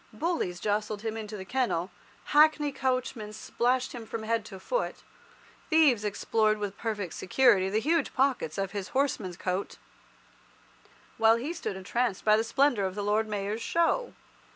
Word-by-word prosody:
Bullies 255 Hz, -, -2 dB
jostled 210 Hz, +1 st, -2 dB
him 220 Hz, -1 st, -2 dB
into 215 Hz, -1 st, -6 dB
the 190 Hz, -, -7 dB
kennel, 205 Hz, -7 st, -1 dB, 0.4 s
Hackney 300 Hz, -1 st, +5 dB
coachmen 255 Hz, -5 st, -2 dB
splashed 250 Hz, +4 st, -1 dB
him 235 Hz, -3 st, -8 dB
from 225 Hz, 0 st, -5 dB
head 225 Hz, 0 st, 0 dB
to 195 Hz, -3 st, -9 dB
foot, -, -, -3 dB, 0.7 s
thieves 295 Hz, -9 st, +4 dB
explored 215 Hz, +1 st, +1 dB
with 205 Hz, -2 st, -4 dB
perfect 205 Hz, -6 st, -3 dB
security 190 Hz, -3 st, +3 dB
the 210 Hz, +3 st, +1 dB
huge 315 Hz, +4 st, +1 dB
pockets 260 Hz, -, +1 dB
of 195 Hz, -1 st, -2 dB
his 200 Hz, -3 st, -4 dB
horseman's 215 Hz, -10 st, 0 dB
coat, 185 Hz, +2 st, -3 dB, 1.4 s
while 225 Hz, 0 st, +6 dB
he 265 Hz, +8 st, -3 dB
stood 330 Hz, -, -4 dB
entranced 200 Hz, +2 st, -1 dB
by 215 Hz, 0 st, +6 dB
the 220 Hz, -, +2 dB
splendour 235 Hz, -3 st, +2 dB
of 190 Hz, 0 st, -3 dB
the 205 Hz, -, -3 dB
Lord 210 Hz, +2 st, +1 dB
Mayor's 210 Hz, +1 st, -3 dB
Show. 340 Hz, -, +1 dB
220 Hz, 155 wpm, -28 LUFS, 205-260 Hz, 1.4 s, while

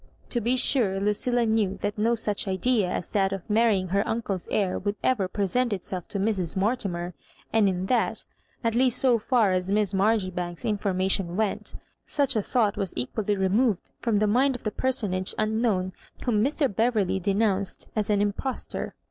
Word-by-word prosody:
To 240 Hz, -, -1 dB
be 240 Hz, +4 st, +2 dB
sure, 230 Hz, -7 st, +2 dB
Lucilla 230 Hz, +4 st, +1 dB
knew 220 Hz, -3 st, +1 dB
that 205 Hz, -, -1 dB
no 225 Hz, +3 st, +2 dB
such 210 Hz, -2 st, -1 dB
idea 195 Hz, +1 st, +1 dB
as -, -, -4 dB
that 195 Hz, -2 st, +2 dB
of 195 Hz, -2 st, -5 dB
marrying 210 Hz, -4 st, +2 dB
her 200 Hz, +2 st, +2 dB
uncle's 205 Hz, -5 st, -2 dB
heir 195 Hz, -3 st, 0 dB
would 205 Hz, +1 st, -2 dB
ever 220 Hz, -8 st, +2 dB
present 210 Hz, +6 st, 0 dB
itself 185 Hz, -2 st, -4 dB
to -, -, -4 dB
Mrs. 190 Hz, -5 st, -1 dB
Mortimer; 190 Hz, -4 st, -1 dB, 0.4 s
and 190 Hz, -4 st, +2 dB
that 245 Hz, 0 st, 0 dB, 0.2 s
— -, -, -38 dB
at 230 Hz, -1 st, +1 dB
least 250 Hz, 0 st, +3 dB
so 250 Hz, -3 st, +3 dB
far 225 Hz, -3 st, +2 dB
as 185 Hz, 0 st, -1 dB
Miss 205 Hz, -1 st, +1 dB
MarjoribanksV 185 Hz, -3 st, 0 dB
in 215 Hz, -3 st, +1 dB
formation 190 Hz, -2 st, 0 dB
went 215 Hz, -2 st, -1 dB, 0.2 s
— -, -, -49 dB
such 275 Hz, -3 st, +1 dB
a 215 Hz, -, +2 dB
thought 210 Hz, -2 st, +1 dB
was 195 Hz, -3 st, -3 dB
equally 205 Hz, -, -1 dB
removed 195 Hz, +2 st, +1 dB
ttom 225 Hz, -4 st, +1 dB
the 215 Hz, -, +3 dB
mind 255 Hz, +6 st, +3 dB
of 245 Hz, -, -8 dB
the 215 Hz, -, -1 dB
personage 205 Hz, -7 st, 0 dB
un 215 Hz, +1 st, 0 dB
known, 185 Hz, -6 st, 0 dB, 0.3 s
whom 215 Hz, -4 st, +2 dB
Mr. 285 Hz, +2 st, +1 dB
Beverley 220 Hz, -5 st, +1 dB
denounced 200 Hz, 0 st, 0 dB
as 215 Hz, -2 st, -1 dB
an 205 Hz, -1 st, +3 dB
im 205 Hz, -1 st, 0 dB
postor. 265 Hz, +4 st, -5 dB
210 Hz, 185 wpm, -26 LUFS, 190-230 Hz, 0.4 s, least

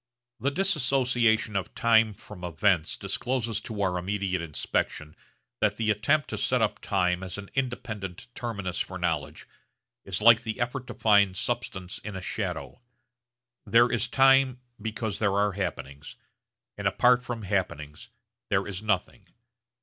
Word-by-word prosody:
The 140 Hz, -, +1 dB
dissociation 130 Hz, -, +2 dB
of 95 Hz, -, -3 dB
time 110 Hz, -2 st, +4 dB
from 95 Hz, -3 st, -12 dB
events 85 Hz, 0 st, +1 dB
discloses 115 Hz, +2 st, -2 dB
to 105 Hz, -3 st, -4 dB
our 90 Hz, -2 st, 0 dB
immediate 95 Hz, -1 st, -2 dB
inspection 75 Hz, -1 st, -3 dB, 0.4 s
that 105 Hz, -1 st, +2 dB
the 110 Hz, 0 st, +1 dB
attempt 140 Hz, +9 st, +2 dB
to -, -, -3 dB
set 125 Hz, -, +2 dB
up 105 Hz, -2 st, 0 dB
time 90 Hz, -3 st, 0 dB
as 95 Hz, +1 st, -5 dB
an 100 Hz, -1 st, -9 dB
independent 110 Hz, -8 st, -4 dB
terminus 100 Hz, -7 st, -4 dB
for -, -, -3 dB
knowledge -, -, -2 dB, 0.6 s
is -, -, -3 dB
like 115 Hz, +1 st, +7 dB
the 110 Hz, -2 st, -5 dB
effort 125 Hz, +1 st, -2 dB
to -, -, -7 dB
find 100 Hz, -3 st, +4 dB
substance 95 Hz, -5 st, -3 dB
in 105 Hz, -2 st, -7 dB
a -, -, -3 dB
shadow. 95 Hz, -, -4 dB, 0.9 s
There 120 Hz, +1 st, +5 dB
is 120 Hz, 0 st, 0 dB
time 135 Hz, 0 st, +4 dB, 0.2 s
because 110 Hz, -1 st, -3 dB
there 100 Hz, -2 st, +1 dB
are 100 Hz, 0 st, +3 dB
happenings, 75 Hz, -7 st, -5 dB, 0.6 s
and -, -, 0 dB
apart 125 Hz, 0 st, +4 dB
from 120 Hz, -3 st, -5 dB
happenings 90 Hz, -7 st, -3 dB, 0.4 s
there -, -, +1 dB
is 100 Hz, -1 st, -5 dB
nothing. 105 Hz, -4 st, -2 dB
105 Hz, 145 wpm, -27 LUFS, 95-120 Hz, 0.9 s, like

